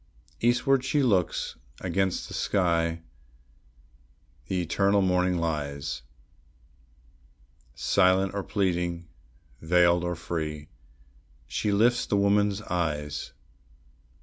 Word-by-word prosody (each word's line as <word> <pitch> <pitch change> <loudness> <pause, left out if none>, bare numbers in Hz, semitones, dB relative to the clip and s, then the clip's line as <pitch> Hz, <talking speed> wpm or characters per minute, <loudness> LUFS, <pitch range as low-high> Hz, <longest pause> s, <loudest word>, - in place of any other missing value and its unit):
Eastward 125 +3 +2
she 140 +2 +1
looks; 95 -9 0 0.2
against 95 +1 -1
the - - -10
sky 85 -3 0 1.4
the 95 - -1
eternal 100 +3 +2
morning 90 -1 +2
lies; 75 -6 -3 1.7
Silent 95 0 +2
or 100 - -2
pleading, 90 -4 -1 0.5
veiled 85 +1 +3
or 90 0 -2
free, 80 -2 -5 0.8
she 105 - -2
lifts 120 +4 +3
the 100 - +1
woman's 100 +1 +2
eyes. 75 -5 -3
90 Hz, 90 wpm, -27 LUFS, 85-100 Hz, 1.7 s, veiled